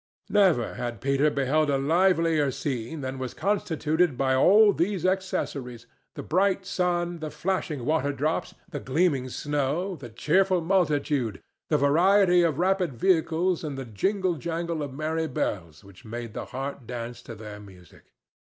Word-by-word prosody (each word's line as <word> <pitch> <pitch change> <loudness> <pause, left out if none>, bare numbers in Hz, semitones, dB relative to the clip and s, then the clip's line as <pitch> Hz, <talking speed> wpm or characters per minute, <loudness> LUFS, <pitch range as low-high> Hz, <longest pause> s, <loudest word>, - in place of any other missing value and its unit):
Never 185 - +3
had 120 -3 -4
Peter 140 +5 +2
beheld 145 +2 +1
a 140 - +2
livelier 165 0 +2
scene 135 +1 -4
than 130 0 -5
was 130 -2 -5
constituted 165 -6 0
by 130 0 +2
all 205 +10 +6
these 185 +1 -1
accessories—the 140 -10 -4
bright 190 +2 +1
sun, 175 -2 -1
the 155 -1 -4
flashing 150 -4 -3
water 150 -1 +1
drops, 150 +4 -2
the 160 -5 -6
gleaming 135 -2 0
snow, 150 +8 -2
the 135 -6 -10
cheerful 185 - +2
multitude, 150 - 0 0.3
the 150 - +3
variety 180 +6 +4
of 165 -5 +1
rapid 180 -3 +1
vehicles 170 +3 +1
and 145 -3 -4
the 135 - -5
jingle 185 - -1
jangle 165 +2 -3
of 145 -2 -4
merry 160 +3 -2
bells 85 - -3
which 100 -2 -16
made 115 0 -7
the - - -5
heart 135 -2 -6
dance 120 0 -6
to 115 - -9
their 105 -1 -9
music. 95 -5 -16
150 Hz, 150 wpm, -26 LUFS, 130-180 Hz, 0.3 s, all